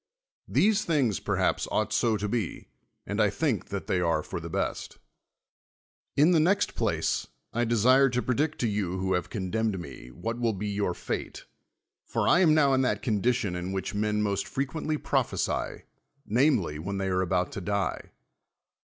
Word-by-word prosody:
These 215 +1 +3
things, 135 - +1
perhaps, - - 0
ought - - 0
so 115 -2 +2
to 105 +3 -2
])e, 110 -8 -4 0.4
and 100 +2 -3
T 105 -2 +4
think 125 +2 -1
that 100 -1 -4
they 90 - 0
are 85 -3 +1
for - - -5
tlie - - -7
best. - - -3 1.2
In 150 +5 +6
the 170 - +5
next 180 +6 +1
])lace, - - 0 0.3
I 120 +1 +1
desii'e 125 +4 +4
to 125 - +1
predict 145 +5 0
to 120 - +2
you 100 -4 -1
who 95 0 0
have 90 -1 -1
condemned 105 0 -1
me, 75 -7 -9
\vliat 115 - -5
will 115 -2 +1
be 105 +2 -3
your 100 -3 -1
fate: - - -5 0.6
for - - -1
r 180 - +5
am 160 -4 +5
now 140 -3 +4
in 130 - +3
that 130 - 0
condition 110 -3 +1
in 90 +2 -4
which 95 +2 -3
men 105 0 0
most 100 -2 -1
freciuently 150 +3 -2
prophesy, - - -1 0.4
namel>', 110 - +2
when 100 +5 -4
they 95 -1 -1
arc 90 -1 0
al)out 90 0 +1
to 100 - -5
die. 100 +2 -2
105 Hz, 175 wpm, -28 LUFS, 95-130 Hz, 1.2 s, In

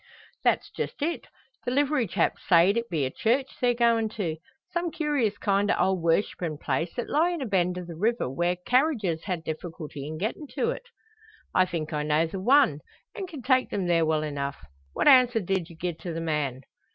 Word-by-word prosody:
"That's - - +1
just 290 - -4
it. 335 +3 -2 0.4
The - - -2
livery 280 -2 +1
chap - - +1
sayed 175 +3 +4
it 235 0 -2
be 155 -6 0
a 130 - -3
church 260 - 0
they're 245 -1 +3
goin' 230 -2 +3
to; 165 -7 -2 0.4
some 345 0 0
curious 290 -10 0
kind 200 0 +1
o' - - +3
old 190 -2 +1
worshippin' 165 -1 0
place, 150 +5 -1
that 240 - -3
lie 320 +4 +2
in 350 -1 -3
a 270 - -3
bend 180 -4 +1
o' 180 - -5
the 170 -1 -8
river, 225 - 0
where 175 +7 0
carriages 245 - +1
ha' 185 - 0
difficulty 155 -3 -6
in 155 +1 -5
gettin' 220 - -3
to 465 - +1
it." - - -7 0.7
"I 185 - +5
think 165 -3 -4
I 150 - 0
know 150 +2 +2
the 175 +4 -5
one, 250 - +4 0.3
an' 390 -4 -5
can 305 -8 -9
take 255 0 +3
them 195 -3 -2
there 170 -1 +3
well 155 -1 +1
enough. 140 - -4 0.3
What - - 0
answer 255 -4 +7
did 190 -3 -2
you 170 - -12
gie 175 +2 -3
to 175 +1 -5
the 165 - -3
man?" 150 -5 -1
190 Hz, 205 wpm, -27 LUFS, 160-250 Hz, 0.7 s, answer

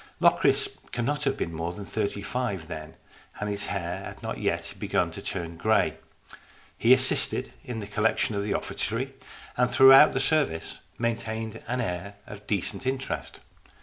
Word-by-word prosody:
Locris - - +4 0.2
cannot 145 +5 -1
have 135 -1 +1
been 85 - -3
more 85 +2 -3
than 100 +2 -7
thirty 100 -1 -2
five 100 -7 -3
then, 80 -2 -7 0.4
and 105 - -2
his 100 0 -3
hair 90 -3 -3
had - - -9
not - - -4
yet - - -1
begun - - 0
to - - -8
turn 85 -2 -4
grey. 110 +6 +2 0.8
He - - +3
assisted - - +4
in 120 -3 -5
the - - -5
collection 105 +2 +1
of 100 - -1
the 100 - -1
offertory, 125 +6 -2 0.4
and 125 0 +3
throughout 135 +3 +8
the 135 - 0
service 135 - 0 0.2
maintained 115 -1 -3
an 125 +1 -1
air 95 -1 -4
of 105 0 -11
decent 105 +5 -1
interest. 130 - -3
110 Hz, 160 wpm, -27 LUFS, 95-125 Hz, 0.8 s, throughout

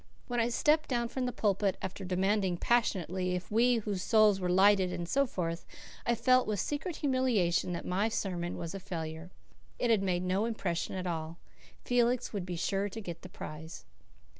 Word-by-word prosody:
When 245 -1 -2
I 230 +1 +2
stepped 305 +6 +2
down 240 -2 0
from 255 0 -2
the - - -1
pulpit, 200 -3 +1
after 190 +1 -5
demanding 190 0 +1
passionately 185 -5 +1
if 180 +2 -6
we 240 +3 +4
whose 205 -4 -2
souls 215 -1 +4
were 180 -1 -1
lighted 190 0 +5
and 170 -1 -4
so 275 +8 +2
forth, 170 -6 -3 0.4
I 235 - +3
felt 255 +2 +3
with 210 -2 -1
secret 310 +4 -2
humiliation 245 - +1
that 170 - -5
my 195 +5 +1
sermon 175 -5 -2
was 170 0 -5
a 195 - -5
failure. 165 -2 -6 0.5
It 240 - +1
had 220 -3 +4
made 180 -2 0
no 185 +4 +1
impression 205 -7 -2
at 185 -1 -3
all. 165 -1 -3 0.5
Felix 245 -1 +1
would 190 -3 -3
be 180 - -3
sure 195 +4 -1
to 225 - -7
get 170 -5 -7
the 185 - -10
prize. 160 -1 -8
195 Hz, 190 wpm, -31 LUFS, 180-235 Hz, 0.5 s, lighted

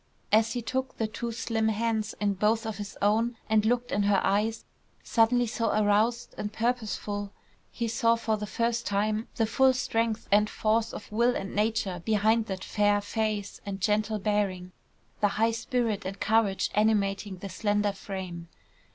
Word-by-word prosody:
As 220 +1 +4
he 245 -2 -3
took 260 +3 -3
the 225 - 0
two 230 +2 -4
slim 225 -1 -1
hands 220 0 -1
in 205 -1 +1
both 215 +4 +1
his 205 -1 -7
own 225 +3 +2
and 220 -1 +3
looked 245 +1 0
in 205 - +1
her 200 -1 +3
eyes, 215 +3 0 0.4
suddenly 240 +1 +3
so 230 0 -1
aroused 215 +3 +1
and 210 - -3
purposeful, 215 -3 -2 0.4
he 235 - -3
saw 230 +1 +2
for 230 -1 -1
the 210 0 -5
first 235 +2 -1
time, 215 +2 0
the 225 - +2
full 260 +4 +4
strength 230 -3 -1
and 210 +1 +4
force 225 +1 0
of 210 - -9
will 235 +3 +2
and 195 - -4
nature 210 -4 0
behind 220 +2 +2
that 190 -1 -4
fair 205 -1 +2
face 210 -1 -3
and 195 -1 -5
gentle 215 +2 +1
bearing, 195 -3 -1 0.5
the 210 - +4
high 225 +1 +3
spirit 230 -2 -1
and 195 +1 -6
courage 215 -3 +2
animating 205 -2 +1
the 195 - -7
slender 205 +1 0
frame. 190 -4 -7
215 Hz, 165 wpm, -28 LUFS, 205-230 Hz, 0.5 s, As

